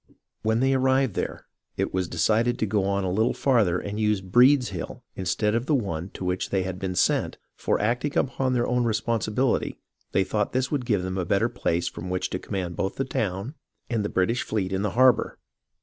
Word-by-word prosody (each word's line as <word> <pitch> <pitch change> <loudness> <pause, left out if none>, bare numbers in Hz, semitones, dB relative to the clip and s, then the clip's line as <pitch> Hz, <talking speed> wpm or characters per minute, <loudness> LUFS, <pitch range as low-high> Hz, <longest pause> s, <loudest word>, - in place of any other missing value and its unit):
When 110 +2 +1
they 135 +1 +3
arrived 130 -2 +2
there, - - -4 0.3
it - - -1
was 95 -1 0
decided 110 +9 +1
to - - 0
go 100 -1 0
on 100 0 0
a 95 - -1
little 110 +5 +1
farther 110 -10 +2
and 100 +3 -4
use 105 -2 +2
Breed's 125 +7 +4
Hill 90 -4 -6
instead 95 +3 0
of 115 +2 -1
the 150 - +3
one 90 - -2
to 95 - -5
which 90 0 -1
they 95 -1 +1
had 95 0 -5
been 95 -1 -3
sent; - - +1 0.2
for, - - 0
acting 125 +7 0
upon 130 -1 0
their 120 -1 +1
own 125 0 +1
responsibil 115 +2 +1
ity, - - -6 0.3
they 95 - +3
thought 105 +2 -1
this 130 0 0
would 135 -5 -1
give 105 -6 +1
them 95 +1 -3
a - - 0
better - - +2
place 85 +1 -1
from 90 +2 -6
which 90 0 -2
to 90 - -2
command 90 -4 -4
both 95 0 -2
the 135 - -1
town 105 +1 -2 0.4
and 115 -3 0
the 105 - -2
British 115 +7 +1
fleet 95 -3 -2
in 95 - 0
the 105 - 0
harbour. 130 -3 +4
105 Hz, 215 wpm, -25 LUFS, 95-125 Hz, 0.4 s, Breed's